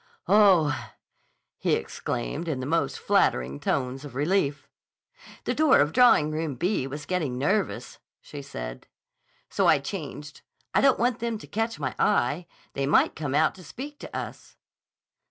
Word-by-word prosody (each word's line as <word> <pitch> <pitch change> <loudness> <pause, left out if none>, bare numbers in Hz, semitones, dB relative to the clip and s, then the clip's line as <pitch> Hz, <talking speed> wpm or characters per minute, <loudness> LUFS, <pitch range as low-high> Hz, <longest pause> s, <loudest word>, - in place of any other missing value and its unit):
"Oh!" 160 - +4 0.7
he - - +1
exclaimed 145 +7 -4
in 150 -5 -2
the 130 - -4
most 165 +4 0
flattering 65 +3 +1
tones 130 - -2
of 140 -4 -10
relief. 145 -2 0 0.8
"The - - -1
door 310 -3 +4
of 150 +2 +2
Drawing 235 -12 +5
Room 155 -2 -2
B 175 - 0
was 145 +1 -7
getting 150 -7 -2
nervous," 190 +10 -1 0.2
she 145 - -9
said. - - -7 0.6
"So - - +2
I - - +6
changed. 150 0 -7 0.3
I - - +4
don't 275 -1 +5
want 240 0 +1
them 235 -1 -2
to - - -11
catch 225 -1 -2
my 135 -3 -2
eye. 150 +8 +1 0.3
They 135 0 -1
might 145 - +3
come 145 -3 -3
out 155 +1 +3
to 185 - -14
speak 275 - -8
to - - -7
us." - - -8
150 Hz, 155 wpm, -26 LUFS, 135-195 Hz, 0.8 s, I